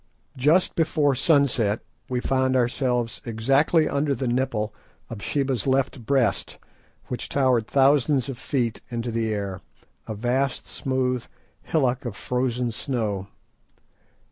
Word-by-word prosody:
Just 150 +8 +3
before 150 -3 +2
sunset 130 -7 +2 0.3
we 125 -1 0
found 130 0 +1
ourselves 125 -1 0
exactly 135 +8 +2
under 140 0 0
the 130 - -2
nipple 120 -4 0 0.4
of 110 -3 -6
Sheba's 135 -5 -1
left 130 -3 0
Breast, 130 -7 +1 0.5
which 125 - -4
towered 130 -5 +2
thousands 140 -1 +3
of 135 -3 -6
feet 125 -4 -1
into 120 0 -3
the 115 -1 -1
air, 100 -2 -3 0.5
a 110 - -4
vast 125 +4 0
smooth 130 -2 -1 0.3
hillock 130 -5 0
of 115 -4 -4
frozen 125 0 -1
snow. 110 -5 -2
125 Hz, 120 wpm, -25 LUFS, 115-135 Hz, 0.5 s, Just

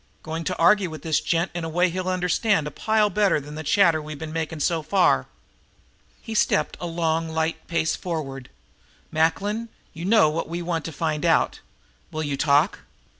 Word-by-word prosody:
"Going 160 +1 -4
to - - -2
argue 185 +2 +4
with 155 -3 -9
this 160 -2 +1
gent 170 +2 0
in 175 -1 -4
a 165 - -3
way 175 +2 +2
he'll 185 +1 -3
understand 185 0 +1
a 150 - -4
pile 215 +5 +1
better 200 -4 +2
than 145 +1 -10
the 155 - -5
chatter 165 0 +3
we've 150 0 -7
been 155 +1 -7
making 160 -1 -3
so 165 0 +1
far." 185 +4 +2 1.0
He 225 - -6
stepped 220 - +1
a 175 - -4
long 165 -1 -1
light 160 0 -2
pace 160 -2 0
forward. 135 -7 -5 0.6
"Macklin, 200 +8 0 0.2
you 165 +2 -6
know 215 -4 +5
what 155 +1 -2
we 170 +1 -3
want 165 -3 -2
to 165 - -4
find 155 0 -2
out. 165 -1 +2 0.5
Will 155 0 -3
you 145 -2 -2
talk?" 145 +4 +2
165 Hz, 185 wpm, -24 LUFS, 155-180 Hz, 1.0 s, know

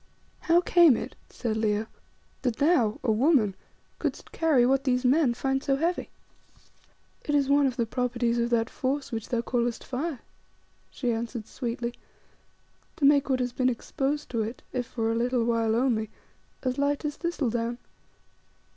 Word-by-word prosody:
"How 345 0 +3
came 340 -8 +6
it," - - -6
said 220 -3 -3
Leo, 215 0 0 0.6
"that 245 -4 0
thou, 265 -8 +2
a 230 - +2
woman, 230 - +3 0.5
couldst - - -4
carry 300 -7 +3
what 270 +2 +2
these 255 -1 +1
men 260 -1 +3
find 270 +2 0
so 275 - +2
heavy?" 335 +5 -1 1.1
"It 295 - 0
is 280 -1 +2
one 285 0 +4
of 255 0 -3
the 235 - +1
properties 240 0 -1
of 235 0 +1
that 230 -1 +2
force 275 +2 -3
which 225 -2 -4
thou 235 -2 0
callest 240 -1 -1
fire," 270 +1 -4 0.7
she 245 -3 -2
answered 230 -1 -4
sweetly, 240 0 -4 1.0
"to 285 - 0
make 285 0 +4
what 260 -1 +1
has 245 -1 -2
been 255 0 +2
exposed 275 +4 -2
to 230 -2 0
it, 225 +3 -5
if 250 -2 -2
for 225 -1 -1
a - - 0
little 240 +1 +1
while 230 -1 +1
only, 230 -3 +1 0.5
as 255 0 -1
light 285 +1 0
as 295 -1 -3
thistle 340 -8 -1
down. 235 0 -2
250 Hz, 165 wpm, -27 LUFS, 235-280 Hz, 1.1 s, came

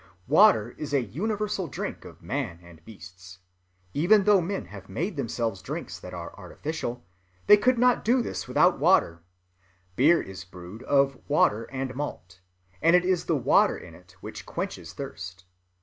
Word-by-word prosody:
Water 130 - +5
is 145 -1 -2
a 135 - +2
universal 200 - -2
drink 135 - -6
of - - -13
man 85 - -3
and 85 -2 -16
beasts. 90 -3 -13 0.6
Even 195 +7 +4
though 205 -2 +5
men 195 +3 -3
have 95 -2 -12
made 165 - -3
themselves 115 -7 -2
drinks 90 - -6
that - - -10
are - - -7
artificial, 135 - -5 0.4
they 210 - +9
could 250 +4 +2
not 250 +1 +3
do 240 +2 +3
this - - -5
without - - +3
water. 85 0 +3 0.7
Beer 160 - +5
is 95 -1 -7
brewed 90 +4 -11
of 135 0 +2
water 115 -6 +2
and 130 -1 -5
malt, 95 -9 -6 0.4
and 165 +2 +5
it 180 0 +3
is 185 -2 +1
the 165 - +1
water 125 - +3
in - - -12
it - - -18
which - - -8
quenches - - -5
thirst. 90 +1 -8
135 Hz, 165 wpm, -26 LUFS, -, 0.7 s, they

